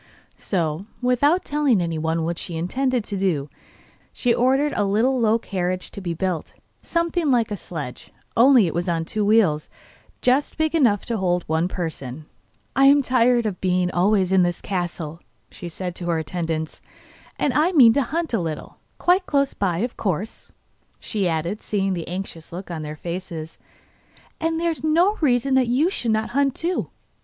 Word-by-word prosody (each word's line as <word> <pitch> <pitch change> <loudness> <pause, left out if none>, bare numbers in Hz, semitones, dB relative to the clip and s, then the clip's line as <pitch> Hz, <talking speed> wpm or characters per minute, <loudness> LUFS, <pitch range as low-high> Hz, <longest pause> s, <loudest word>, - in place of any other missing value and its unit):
So, 170 0 -2
without 270 +8 +2
telling 285 -7 +2
anyone 165 -1 -1
what 165 +1 -2
she 170 - -5
intended 250 +8 0
to 205 -1 -3
do, 160 -7 -1 0.6
she 245 -2 +1
ordered 270 +5 +2
a 205 - +1
little 225 +7 +2
low 225 -1 +3
carriage 185 -4 -3
to 200 - -8
be 170 -3 -3
built, 180 -1 -3 0.3
something 335 -2 0
like 235 -4 +2
a - - -1
sledge, 150 -9 -7 0.2
only 245 -2 +6
it 165 - -2
was 175 +2 -1
on 165 -1 0
two 215 +5 -1
wheels 200 -8 +3 0.5
just 260 +3 +1
big 315 0 +1
enough 240 - +3
to 230 - -2
hold 180 -3 0
one 160 +2 0
person. 155 -6 -5 0.5
'I 270 - +5
am 285 +1 +7
tired 245 -1 +3
of 205 -4 -3
being 180 -1 +1
always 190 +1 +2
in 190 -1 +5
the 175 0 +3
castle,' 170 -4 -4 0.3
she 175 - -8
said 180 +1 -5
to 175 - -5
her 170 -1 +1
attendants; 160 0 -3 0.6
'and 280 - 0
I 315 +4 +3
mean 250 -10 +7
to 280 - +2
hunt 320 +3 -2
a 225 - +2
little. 160 -3 -5 0.2
Quite 365 +1 +2
close 280 -1 +1
by, 180 -4 -1
of 245 - -8
course,' 200 +2 -3 0.5
she 200 -5 -1
added, 170 +6 -2
seeing 195 -2 -1
the 170 -3 -4
anxious 175 -3 -6
look 180 +1 -7
on 165 -2 -4
their 150 0 -6
faces. 170 -1 -6 0.8
'And 325 0 0
there 335 0 +1
is 320 - -7
no 345 +7 +3
reason 265 -2 +2
that 260 -2 +3
you 280 +10 +2
should 240 - -2
not 220 0 +1
hunt 275 0 +1
too. 350 +2 -2
200 Hz, 180 wpm, -23 LUFS, 170-260 Hz, 0.8 s, am